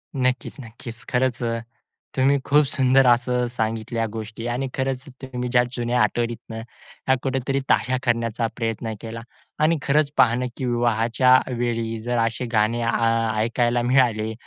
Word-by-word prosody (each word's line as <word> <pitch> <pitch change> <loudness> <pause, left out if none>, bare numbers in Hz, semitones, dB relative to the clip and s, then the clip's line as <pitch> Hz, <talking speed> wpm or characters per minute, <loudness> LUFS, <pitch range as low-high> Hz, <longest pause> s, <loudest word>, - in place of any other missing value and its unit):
नक्कीच, 130 -1 -1
नक्कीच, 115 -1 -10
खरंच 125 -1 0 0.7
तुम्ही 135 +2 +3
खूप 150 +1 +5
सुंदर 135 -1 +3
असं 125 +1 +3
सांगितल्या 115 0 -2
गोष्टी 115 +1 -6
आणि 135 +2 -2
खरंच 130 -1 -2 0.2
तुम्ही 125 -2 -4
ज्या 120 0 +4
जुन्या 120 0 0
आठवणीतनं 115 -1 -2 0.5
ह्या 130 - +5
कुठेतरी 135 0 -1
ताज्या 130 0 +2
करण्याचा 115 -1 0
प्रयत्न 115 -1 -3
केला 115 0 -6 0.4
आणि 165 +1 +3
खरंच 145 +1 +2
पाहणं 125 +1 +4
की 130 - -3
विवाहाच्या 120 +1 +3 0.2
वेळी 115 -2 -2
जर 120 +2 -2
असे 115 +2 -3
गाणे 110 +2 +2
आ, 115 -1 +1
ऐकायला 120 +1 +1
मिळाले 120 -3 +2
120 Hz, 135 wpm, -23 LUFS, 115-130 Hz, 0.7 s, खूप